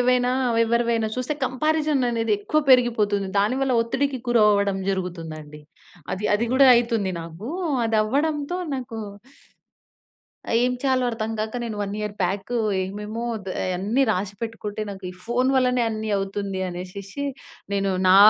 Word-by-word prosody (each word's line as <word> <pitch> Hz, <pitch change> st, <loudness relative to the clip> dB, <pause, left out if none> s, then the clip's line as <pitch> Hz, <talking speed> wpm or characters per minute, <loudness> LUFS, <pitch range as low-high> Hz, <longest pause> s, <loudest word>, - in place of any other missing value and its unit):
ఏవైనా 250 Hz, 0 st, +3 dB, 0.3 s
ఎవరివైనా 235 Hz, -1 st, +1 dB
చూస్తే 255 Hz, +4 st, -1 dB
కంపారిజన్ 305 Hz, +2 st, +1 dB
అనేది 225 Hz, -2 st, 0 dB
ఎక్కువ 305 Hz, +9 st, +1 dB
పెరిగిపోతుంది. 215 Hz, -6 st, +3 dB
దానివల్ల 255 Hz, +6 st, +1 dB
ఒత్తిడికి 265 Hz, +3 st, -1 dB
గురవ్వడం 205 Hz, -4 st, +4 dB
జరుగుతుందండి. 165 Hz, -5 st, -5 dB, 0.5 s
అది 195 Hz, +3 st, -6 dB
అది 215 Hz, +3 st, +1 dB
గూడా 270 Hz, +1 st, +7 dB
అయితుంది 230 Hz, -5 st, +1 dB
నాకు. 165 Hz, +7 st, -8 dB, 0.4 s
అదవ్వడంతో 285 Hz, +9 st, 0 dB, 0.2 s
నాకు 245 Hz, -4 st, -5 dB, 1.6 s
ఏం 250 Hz, -, +3 dB
చేయాలో 260 Hz, -2 st, +2 dB
అర్థం 225 Hz, -1 st, -3 dB
కాక 220 Hz, +3 st, -2 dB
నేను 225 Hz, -2 st, -4 dB
1 200 Hz, -1 st, -2 dB
ఇయర్ 210 Hz, -1 st, -3 dB
బ్యాక్ 195 Hz, +4 st, -2 dB, 0.3 s
ఏమేమో 210 Hz, +4 st, -4 dB
ఆహ్, 200 Hz, -3 st, -6 dB, 0.2 s
అయన్నీ 195 Hz, +8 st, +1 dB
రాసి 195 Hz, -1 st, -1 dB
పెట్టుకుంటే 220 Hz, -2 st, -4 dB
నాకు 195 Hz, -1 st, -9 dB
ఈ -, -, -10 dB
ఫోన్ 245 Hz, +3 st, +1 dB
వల్లనే 250 Hz, -1 st, +3 dB
అన్నీ 220 Hz, 0 st, -3 dB
అవుతుంది 195 Hz, 0 st, -3 dB
అనేషేసి 185 Hz, +7 st, -6 dB, 0.5 s
నేను 195 Hz, -1 st, +1 dB, 0.2 s
నా 185 Hz, -, +7 dB
220 Hz, 130 wpm, -24 LUFS, 195-250 Hz, 1.6 s, గూడా